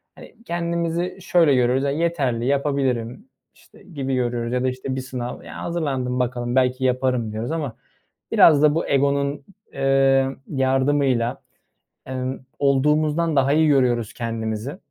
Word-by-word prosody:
Hani, - - -14
kendimizi 170 +1 -2
şöyle 170 -6 +3
görüyoruz, 125 +2 +2
ya, 140 - +1
yeterli 140 -7 -1
yapabilirim, 140 - -1 0.2
işte, - - -21
gibi 135 -7 -4
görüyoruz 120 -1 -1
ya 125 - 0
da, 130 - +2
işte, 130 +1 -4
bir 130 - -3
sınav, 125 -1 -6
ya, - - -8
hazırlandım 135 -7 -2
bakalım, 120 0 -2
belki 130 0 +2
yaparım 125 -3 0
diyoruz 110 +3 -4
ama 150 -8 -3 0.6
biraz 150 -3 +6
da 150 0 +4
bu 165 - -1
egonun, 140 +1 +1 0.3
eee, 135 0 +3 0.2
yardımıyla, 135 -2 +1 0.6
emm, 130 0 -4 0.2
olduğumuzdan 150 +3 +2
daha 135 +1 +3
iyi 155 0 +4
görüyoruz 125 -6 +2
kendimizi. 115 +3 -4
135 Hz, 135 wpm, -22 LUFS, 125-150 Hz, 0.6 s, biraz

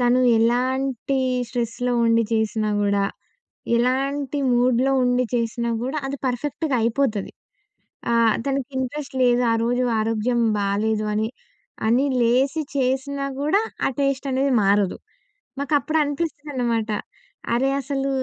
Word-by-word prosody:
తను 245 +1 +3 0.2
ఎలాంటి 255 +3 0 0.3
స్ట్రెస్‌లో 245 0 -2
ఉండి 230 0 +4
జేసినా 220 -1 0
గూడా, 200 -1 +2 0.7
ఎలాంటి 270 +3 0
మూడ్‍లో 250 +2 +3
ఉండి 250 0 +2
చేసినా 235 0 -1
కూడా, 265 +5 -3
అది 275 - -3
పర్ఫెక్ట్‌గా 280 +3 -2
అయిపోతది. 230 -3 0 0.8
ఆహ్, 230 -2 +4
తనకి 275 -2 -1
ఇంట్రెస్ట్ 265 +2 -4
లేదు, 245 0 +4
ఆ - - +3
రోజు 245 +2 +1 0.2
ఆరోగ్యం 225 +2 0 0.2
బాలేదు, 210 +2 0
అని, 215 +1 0 0.6
అని 250 +5 +3 0.2
లేసి 265 +6 +2
చేసినా 275 +1 -1
గూడా, 310 +9 +2 0.2
ఆ - - +2
టేస్టనేది 275 -1 0
మారదు. 200 -1 +2 0.6
మాకప్పుడు 295 +2 +1
అనిపిస్తుందన్నమాట, 285 -7 -2 0.6
అరే! 265 +3 +2
అసలు 275 0 -2
250 Hz, 110 wpm, -23 LUFS, 230-275 Hz, 0.8 s, ఉండి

